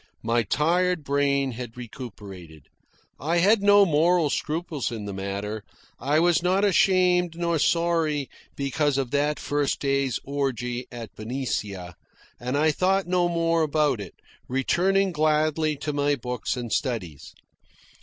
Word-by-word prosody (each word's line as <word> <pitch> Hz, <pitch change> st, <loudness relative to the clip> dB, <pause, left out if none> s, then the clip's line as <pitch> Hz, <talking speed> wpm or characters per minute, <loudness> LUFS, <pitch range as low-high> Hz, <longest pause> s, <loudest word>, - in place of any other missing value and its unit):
My 115 Hz, +1 st, +2 dB
tired 170 Hz, -, +1 dB
brain 140 Hz, -1 st, +1 dB
had 120 Hz, -1 st, -8 dB
recuperated. 100 Hz, -, -10 dB, 0.6 s
I 165 Hz, +4 st, 0 dB
had 200 Hz, +5 st, +4 dB
no 205 Hz, 0 st, +6 dB
moral 165 Hz, -1 st, +3 dB
scruples 155 Hz, -4 st, -2 dB
in 110 Hz, -3 st, -5 dB
the 100 Hz, -, -5 dB
matter. 100 Hz, +2 st, -4 dB, 0.4 s
I 145 Hz, +5 st, +2 dB
was 170 Hz, -1 st, +3 dB
not 185 Hz, +3 st, +2 dB
ashamed 180 Hz, -3 st, +3 dB
nor 170 Hz, -2 st, 0 dB
sorry 165 Hz, -4 st, +1 dB, 0.3 s
because 140 Hz, +1 st, 0 dB
of 130 Hz, -3 st, -2 dB
that 145 Hz, +1 st, +1 dB
first 145 Hz, -1 st, -1 dB
day's 140 Hz, -3 st, 0 dB
orgy 130 Hz, -3 st, -3 dB
at 120 Hz, -2 st, -8 dB
Benicia, 105 Hz, -6 st, -4 dB, 0.5 s
and 125 Hz, +3 st, -2 dB
I 155 Hz, +2 st, +3 dB
thought 190 Hz, +5 st, +1 dB
no 175 Hz, 0 st, +1 dB
more 165 Hz, -1 st, +1 dB
about 150 Hz, -6 st, +1 dB
it, 95 Hz, -, -9 dB, 0.3 s
returning 185 Hz, +9 st, +1 dB
gladly 155 Hz, 0 st, +1 dB
to 145 Hz, +1 st, -4 dB
my 145 Hz, 0 st, +1 dB
books 125 Hz, -1 st, -3 dB
and 120 Hz, -2 st, -4 dB
studies. 95 Hz, -, -3 dB
145 Hz, 135 wpm, -25 LUFS, 125-170 Hz, 0.6 s, no